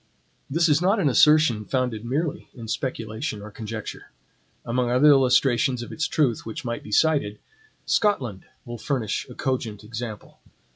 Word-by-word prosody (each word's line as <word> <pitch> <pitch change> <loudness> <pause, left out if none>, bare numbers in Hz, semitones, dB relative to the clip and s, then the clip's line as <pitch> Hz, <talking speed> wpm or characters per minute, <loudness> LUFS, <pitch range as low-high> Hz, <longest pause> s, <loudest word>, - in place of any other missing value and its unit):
This 165 +4 +2
is 150 0 +3
not 195 +4 +3
an 155 -7 +3
assertion 150 -5 +5
founded 125 -2 -2
merely 145 +6 -2
in 115 -3 -9
speculation 110 -3 -3
or 105 +1 -9
conjecture. 110 0 -7 0.6
Among 120 +1 0
other 130 +5 +5
illustrations 130 -2 +3
of - - -9
its 160 0 -1
truth 135 -8 +1
which 110 +2 -7
might 120 -1 -3
be - - -11
cited, 140 -5 +2 0.5
Scotland 130 - 0 0.2
will 120 -1 -7
furnish 125 -4 -2
a 125 - -10
cogent 120 -6 -3
example. 110 -1 -7
125 Hz, 150 wpm, -24 LUFS, 110-145 Hz, 0.6 s, assertion